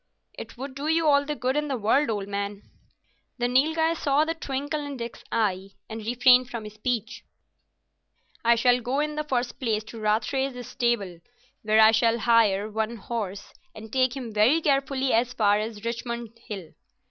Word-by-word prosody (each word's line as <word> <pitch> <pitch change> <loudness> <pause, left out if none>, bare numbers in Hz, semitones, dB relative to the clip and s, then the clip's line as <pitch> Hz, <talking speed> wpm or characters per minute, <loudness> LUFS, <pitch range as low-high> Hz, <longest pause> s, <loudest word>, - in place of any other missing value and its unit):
"It - - -10
would 265 +2 -6
do 280 +2 -5
you 320 0 +2
all 285 -1 +4
the 300 +1 -3
good 255 +1 -1
in 300 0 0
the 270 -3 -2
world, 230 +7 +2
old 205 -3 -2
man." 200 0 -4 0.7
The 245 -1 0
Nilghai 320 +6 +2
saw 295 -2 +1
the 325 - -1
twinkle 290 0 -3
in 285 -2 -6
Dick's 235 -1 -7
eye, 195 -3 -1
and 220 0 -7
refrained 250 +2 +4
from 225 -3 -6
speech. 220 +1 -3 1.2
"I 235 0 +5
shall 245 +1 +3
go 250 +4 -1
in 300 0 -1
the 305 0 -2
first 250 -4 -2
place 220 -4 -1
to 225 +1 -10
Rathray's 245 +4 -1
stable, 205 -8 -1 0.4
where 215 0 +2
I 220 0 +8
shall 230 +1 +2
hire 220 -4 +3
one 220 +2 -2
horse, 205 -3 -5 0.2
and 220 0 -11
take 260 -1 +2
him 240 -4 -6
very 220 +10 +4
carefully 275 -3 +1
as 240 +2 +2
far 205 -4 +3
as 215 0 -5
Richmond 235 -1 -4 0.2
Hill. 195 -8 -7
235 Hz, 175 wpm, -26 LUFS, 215-270 Hz, 1.2 s, I